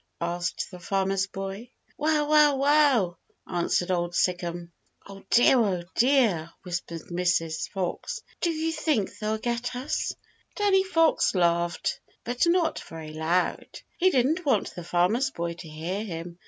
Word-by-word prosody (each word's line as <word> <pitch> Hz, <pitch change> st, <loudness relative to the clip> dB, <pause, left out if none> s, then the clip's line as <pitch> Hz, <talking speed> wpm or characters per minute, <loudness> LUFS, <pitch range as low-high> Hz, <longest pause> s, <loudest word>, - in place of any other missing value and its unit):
asked 175 Hz, +2 st, -3 dB
the 180 Hz, -, -9 dB
Farmer's 195 Hz, +1 st, 0 dB
Boy. 195 Hz, +4 st, -6 dB, 0.3 s
"Wow, 300 Hz, 0 st, +1 dB
wow, 300 Hz, -1 st, +5 dB
wow!" 275 Hz, -, +3 dB, 0.3 s
answered 175 Hz, 0 st, 0 dB
Old 175 Hz, -1 st, -1 dB
Sic'em. 175 Hz, -1 st, -1 dB, 0.3 s
"Oh 195 Hz, 0 st, -11 dB
dear, 245 Hz, +2 st, +5 dB
oh 190 Hz, -6 st, +1 dB
dear!" 230 Hz, -, +3 dB
whispered 175 Hz, -2 st, -5 dB
Mrs. 175 Hz, -2 st, 0 dB
Fox, 200 Hz, -, -4 dB, 0.2 s
"do 345 Hz, -, +2 dB
you 325 Hz, 0 st, -1 dB
think 305 Hz, -, -1 dB
they'll 215 Hz, 0 st, -1 dB
get 240 Hz, +2 st, -3 dB
us?" 260 Hz, +5 st, -2 dB, 0.4 s
Danny 400 Hz, -2 st, +3 dB
Fox 330 Hz, -, +2 dB
laughed, 170 Hz, -1 st, +1 dB, 0.2 s
but 245 Hz, +7 st, 0 dB
not 340 Hz, -2 st, +2 dB
very 160 Hz, -1 st, -9 dB
loud. 160 Hz, +3 st, -1 dB
He 370 Hz, -, +4 dB
didn't 305 Hz, +4 st, +1 dB
want 265 Hz, -9 st, +1 dB
the 175 Hz, -, -7 dB
Farmer's 180 Hz, +10 st, +1 dB
Boy 170 Hz, 0 st, -4 dB
to 170 Hz, -1 st, -11 dB
hear 170 Hz, +7 st, -4 dB
him. 170 Hz, -3 st, -7 dB
195 Hz, 140 wpm, -26 LUFS, 175-280 Hz, 0.4 s, wow